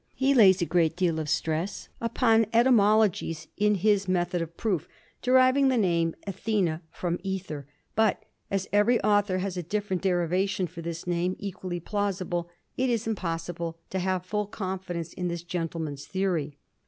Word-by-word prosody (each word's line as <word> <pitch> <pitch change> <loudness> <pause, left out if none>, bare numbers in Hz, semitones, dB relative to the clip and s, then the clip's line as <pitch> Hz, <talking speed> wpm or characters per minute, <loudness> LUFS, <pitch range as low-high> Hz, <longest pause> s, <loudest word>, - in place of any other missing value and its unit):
He 270 +1 +3
lays 195 -7 +6
a - - +1
great 170 -2 +2
deal 170 -3 +1
of 155 -1 -3
stress 160 +5 -1
upon 230 -1 +3
etymologies 215 -8 +3
in 210 0 +3
his 200 0 +2
method 175 -1 0
of 165 0 -6
proof, 180 -7 -1 0.3
deriving 255 +2 +5
the 260 -2 +3
name 170 -5 +1
Athena 190 -4 -1
from 175 +1 -3
æther, 185 -7 -4 0.3
but 220 0 +2 0.3
as 195 -1 -1
every 210 +4 +4
author 205 -2 +3
has 185 0 -3
a - - -1
different 190 +1 -2
derivation 185 +1 +1
for 170 0 -8
this 165 0 -5
name 175 +1 0
equally 185 -3 -5
plausible, 185 -3 -2 0.3
it 260 0 +1
is 230 -2 0
impossible 170 -5 -3
to 190 - -1
have 185 -1 -1
full 210 +1 -2
confidence 185 -4 -4
in 180 - -3
this 170 -1 -4
gentleman's 165 -5 -4
theory. 175 -7 -1
185 Hz, 155 wpm, -27 LUFS, 170-205 Hz, 0.3 s, lays